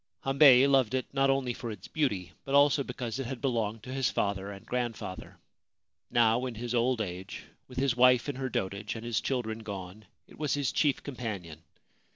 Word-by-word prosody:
Hambei 135 -1 +7
loved 135 -3 +3
it 130 - -1
not 135 0 +3
only 135 -2 +1
for 120 0 -6
its 105 -4 -8
beauty 105 - -1
but 135 - -1
also 140 0 +5
because 125 -2 -4
it 135 - -3
had 130 0 -5
belonged 115 -4 -1
to 130 - -7
his 135 -4 +1
father 100 -1 -1
and 100 -1 -11
grandfather. 120 -6 -4 0.7
Now 120 +2 +3
in 120 - -6
his 120 +2 -4
old 120 0 +2
age, 95 -2 -6 0.2
with 125 - -13
his 130 -2 +2
wife 125 +1 +5
in 140 -3 -3
her 135 -1 -2
dotage 100 0 -3
and 115 0 -7
his 115 -2 0
children 115 -4 -2
gone, 100 -1 -8 0.2
it - - -18
was 150 -2 0
his 145 -3 0
chief 145 -3 +1
companion. 100 - -6
120 Hz, 195 wpm, -29 LUFS, 110-135 Hz, 0.7 s, Hambei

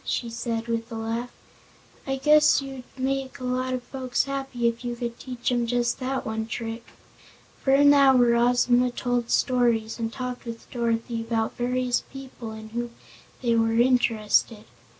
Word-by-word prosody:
she 235 -2 -2
said 230 -1 -3
with 230 0 -3
a - - -5
laugh. 225 +2 -3 0.8
"I 270 - 0
guess 300 +3 +5
you'd 270 -2 -7
make 270 +1 -2
a - - -8
lot 255 +1 -1
of 250 - -6
folks 255 -1 -1
happy 270 -3 -2
if 235 +1 -2
you 240 -1 -3
could 235 -1 -5
teach 250 -1 -3
'em 240 -1 +1
just 240 +1 0
that 260 +1 -2
one 220 0 -3
trick." 230 0 -5 0.8
For - - -2
an 285 +1 +7
hour 265 -4 +5
Ozma 245 +1 +3
told 245 -1 -2
stories, 235 -3 +1
and 225 -1 -2
talked 250 0 -5
with 230 -1 -8
Dorothy 230 -1 -1
about 225 -1 -1
various 250 0 0
people 260 -4 -8
in 220 0 -9
whom 235 +1 -4 0.5
they 235 -1 +2
were 225 0 +2
interested. 230 -3 +2
245 Hz, 165 wpm, -25 LUFS, 230-255 Hz, 0.8 s, an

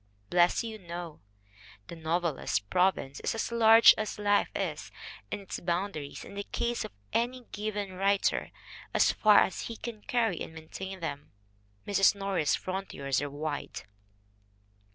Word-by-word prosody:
Bless 175 +3 +4
you, 220 -1 -6
no; 170 -3 -7 0.7
the 170 - -9
novelist's 165 -3 -1
province 140 - 0
is - - -2
as 225 - -2
large 225 -1 +8
as 215 -1 -3
life 205 -1 +2
is, - - -3 0.4
and - - -3
its 195 - -6
boundaries 175 -4 -3
in - - -11
the 200 0 -4
case 235 +3 -2
of - - -7 0.2
any 250 +2 0
given 205 -2 -3
writer 195 +2 +1 0.5
as - - +5
far 210 -2 +5
as 190 - 0
he 230 - -6
can 225 -3 -7
carry 225 -7 0
and 160 - -6
maintain 190 +4 -7
them. 145 -3 -5 0.5
Mrs. 200 0 +4
Norris's 195 -6 +1
frontiers 145 -9 -2
are 145 - -3
wide. 145 +1 -4
190 Hz, 145 wpm, -30 LUFS, 165-210 Hz, 0.7 s, large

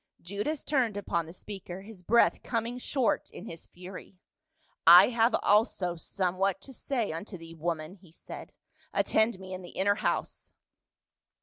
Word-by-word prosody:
Judas 205 - -3
turned 245 -8 +1
upon 170 -5 -1
the - - -9
speaker, 190 0 -8
his 205 -3 -12
breath 235 +6 +3
coming 235 0 -2
short 255 -1 0
in - - -10
his 165 -7 -9
fury. 185 +1 -11 0.4
" 315 - -39
I 195 - +6
have 230 0 +3
also 200 -4 +3
somewhat 185 +2 -1
to 270 - -8
say 240 - -1
unto 185 +5 -6
thee, 165 0 -11
woman," 160 0 -3
he 180 -3 -19
said; - - -10 0.4
"attend 220 -1 +2
me 190 0 -8
in 185 - -5
the 175 - -10
inner 200 +1 +2
house." - - -2
195 Hz, 155 wpm, -29 LUFS, 175-230 Hz, 0.4 s, I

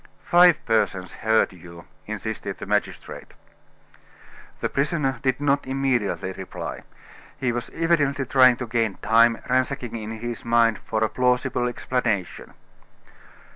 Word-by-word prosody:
"Five 175 -1 +5
persons 100 -5 0
heard 110 -2 +1
you," 85 -2 -13 0.2
insisted - - -5
the - - -7
magistrate. - - -3 1.2
The - - 0
prisoner 140 -3 -1
did 130 -1 0
not 140 -1 +1
immediately 130 -8 -1
reply. 95 0 -7 0.6
He 130 -2 0
was 120 0 -4
evidently 145 -5 +1
trying 130 -1 +5
to 125 - -5
gain 115 -3 -1
time, 115 +1 +3
ransacking 125 -2 -1
in 110 -1 -5
his 115 +1 -6
mind 115 -1 +3
for 110 0 -2
a - - +3
plausible 125 +1 0
explanation. 120 -6 -3
120 Hz, 125 wpm, -24 LUFS, 110-135 Hz, 1.2 s, Five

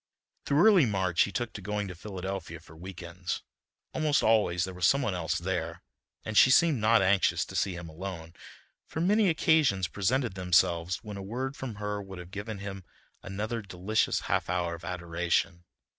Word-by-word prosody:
Through 145 +7 +4
early 190 - +6
March 95 -4 +1
he 100 - -6
took 120 +3 -3
to 105 - -7
going 105 +1 -3
to 90 - -6
Philadelphia 95 -2 -6
for 80 0 -16
week 90 +2 -9
ends. 90 +1 -5 0.5
Almost 155 -2 +1
always 105 -5 +3
there 95 0 -4
was 90 -1 +2
some 140 0 +3
one 105 - -1
else 85 -3 -1
there - - -3 0.4
and 110 - -4
she 130 - +7
seemed 155 -1 +4
not 110 -1 +4
anxious 95 0 +2
to - - -10
see 95 - 0
him 85 -1 -7
alone, 85 0 -7 0.5
for - - -5
many 200 +4 +3
occasions 155 - +3
presented 115 +6 0
themselves 90 -1 +1
when 105 -2 -7
a - - -6
word 130 +7 -4
from 130 -6 -6
her 105 0 -3
would 95 -1 -9
have 90 0 -10
given 105 +2 -5
him 100 -1 -7 0.4
another 110 +4 -4
delicious 100 +2 0
half - - -1
hour 90 -1 0
of 85 0 -9
adoration. 85 0 -1
95 Hz, 185 wpm, -29 LUFS, 90-115 Hz, 0.5 s, she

